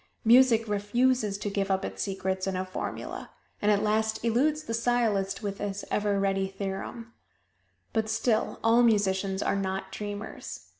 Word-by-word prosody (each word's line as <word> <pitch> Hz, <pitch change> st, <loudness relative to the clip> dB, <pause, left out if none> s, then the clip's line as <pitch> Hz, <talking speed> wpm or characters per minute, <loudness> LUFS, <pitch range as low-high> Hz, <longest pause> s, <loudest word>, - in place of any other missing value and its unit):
Music 230 Hz, -1 st, +6 dB
refuses 210 Hz, +1 st, +1 dB
to 210 Hz, -, -5 dB
give 200 Hz, -1 st, -1 dB
up 190 Hz, 0 st, +1 dB
its -, -, -5 dB
secrets 190 Hz, -1 st, -2 dB
in 190 Hz, -, -1 dB
a 185 Hz, 0 st, -2 dB
formula 185 Hz, -, -5 dB, 0.3 s
and 210 Hz, -, +2 dB
at 205 Hz, 0 st, +3 dB
last 220 Hz, +1 st, 0 dB
eludes 295 Hz, +7 st, +2 dB
the 230 Hz, -, -4 dB
sciolist 230 Hz, -4 st, +1 dB
with 200 Hz, -1 st, -3 dB
his 200 Hz, -1 st, -4 dB
ever 205 Hz, -1 st, +1 dB
ready 195 Hz, -1 st, +1 dB
theorem. 195 Hz, +4 st, -6 dB, 0.8 s
But 220 Hz, -1 st, 0 dB
still, 220 Hz, 0 st, 0 dB
all 230 Hz, +2 st, +5 dB
musicians 195 Hz, -4 st, +2 dB
are -, -, +1 dB
not 190 Hz, -1 st, -3 dB
dreamers. 205 Hz, +1 st, -6 dB
205 Hz, 155 wpm, -28 LUFS, 195-225 Hz, 0.8 s, Music